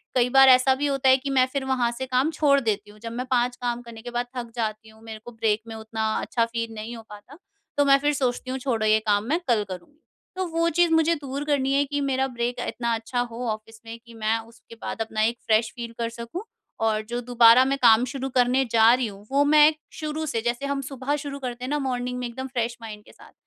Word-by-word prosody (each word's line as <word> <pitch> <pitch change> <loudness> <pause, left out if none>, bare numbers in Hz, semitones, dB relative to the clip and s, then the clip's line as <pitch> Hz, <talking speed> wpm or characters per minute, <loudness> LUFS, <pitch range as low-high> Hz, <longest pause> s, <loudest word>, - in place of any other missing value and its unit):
कई 250 -1 +3
बार 270 +1 +7
ऐसा 255 +1 +5
भी 290 +2 -1
होता 270 -1 +2
है 260 - +7
कि 275 +1 -5
मैं 260 -2 +4
फिर 275 -2 -2
वहाँ 255 -3 +1
से 260 - -3
काम 260 +5 +1
छोड़ 290 -2 +3
देती 210 -4 -2
हूँ। 210 - -18
जब 230 +1 -7
मैं 250 +2 -4
5 245 0 +2
काम 240 0 -2
करने 235 -2 -11
के 245 +1 -8
बाद 240 0 -1
थक 235 -1 -5
जाती 220 -1 -3
हूँ 220 0 -19
मेरे 220 -1 -8
को 240 - -8
ब्रेक 220 -1 0
में 225 - -7
उतना 220 0 -5 0.2
अच्छा 230 -1 0
फील 230 -1 -4
नहीं 220 +2 -6
हो 225 - -11
पाता 210 +8 -13 0.4
तो 285 - +5
मैं 275 0 +6
फिर 295 +1 +1
सोचती 255 -2 -2
हूँ 260 - -2
छोड़ो 235 -5 -1
ये 215 0 +4
काम 205 0 +3
मैं 325 +4 +2
कल 225 -4 +2
करूँगी। 185 - -9 0.4
तो 375 0 -2
वो 335 0 +1
चीज़ 345 +1 +2
मुझे 320 +1 +4
दूर 280 -1 -5
करनी 275 -2 +1
है 285 +1 +3
कि 290 +1 -3
मेरा 265 -1 0
ब्रेक 245 -1 -3
इतना 235 -1 -2
अच्छा 225 +2 -4
हो 240 +2 -5
ऑफिस 220 +1 -8
में 225 +1 -8
कि 235 - -14
मैं 225 0 0
उसके 230 0 -16
बाद - - -5
अपना 220 -1 -2
एक 230 +2 +1
फ्रेश 225 +1 +2
फील 235 -2 -6
कर 230 0 -1
सकूँ। 235 - -7 0.4
और 215 -1 +1
जो 240 - -2
दोबारा 240 0 +6
मैं 275 +1 0
काम 230 -1 +6
शुरू 265 +1 -4
करने 255 +1 +2
जा 230 0 +6
रही 250 -1 0
हूँ 200 0 -11
वो 280 +1 +4
मैं 300 +1 +6 0.3
शुरू 310 0 -3
से 230 -7 -2
जैसे 240 +3 -2
हम 280 0 -2
सुबह 275 +1 -2
शुरू 280 -1 -6
करते 250 -2 -6
हैं - - -5
ना 295 +1 0
मॉर्निंग 250 -1 -2
में 250 - -3
एकदम 260 +3 -6
फ्रेश 240 -2 -3
माइंड 215 -2 -9
के - - -17
साथ, - - -18
245 Hz, 255 wpm, -24 LUFS, 225-270 Hz, 0.4 s, बार